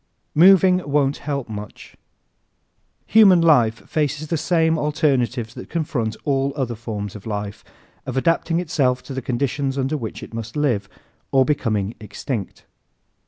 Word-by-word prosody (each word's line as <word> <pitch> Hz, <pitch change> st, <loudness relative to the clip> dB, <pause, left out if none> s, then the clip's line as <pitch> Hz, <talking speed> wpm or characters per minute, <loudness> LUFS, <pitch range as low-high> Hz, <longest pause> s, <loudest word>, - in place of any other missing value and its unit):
Moving 185 Hz, +2 st, +6 dB
Won't 140 Hz, -1 st, +2 dB
Help 140 Hz, -3 st, -4 dB
Much 105 Hz, -2 st, -9 dB, 1.1 s
¶ -, -, -27 dB
Human 200 Hz, -5 st, +7 dB
life 125 Hz, -9 st, +3 dB
faces 150 Hz, 0 st, -2 dB
the 170 Hz, -, 0 dB
same 160 Hz, 0 st, +1 dB
alternatives 125 Hz, -6 st, 0 dB
that -, -, -10 dB
confront 125 Hz, -9 st, -2 dB
all 135 Hz, -1 st, 0 dB
other 130 Hz, -5 st, -2 dB
forms 105 Hz, -3 st, -6 dB
of 105 Hz, +1 st, -9 dB
life 105 Hz, -1 st, -5 dB, 0.4 s
of 130 Hz, 0 st, -3 dB
adapting 165 Hz, +3 st, +1 dB
itself 140 Hz, -8 st, 0 dB
to 140 Hz, -, -8 dB
the 130 Hz, -, -3 dB
conditions 135 Hz, +2 st, -2 dB
under 135 Hz, +3 st, 0 dB
which 115 Hz, -7 st, -6 dB
it -, -, -11 dB
must 115 Hz, +3 st, -6 dB
live 120 Hz, -10 st, 0 dB, 0.4 s
or 135 Hz, -1 st, +4 dB
becoming 110 Hz, -8 st, -1 dB
extinct. 105 Hz, +1 st, -6 dB
135 Hz, 145 wpm, -21 LUFS, 115-155 Hz, 1.1 s, Human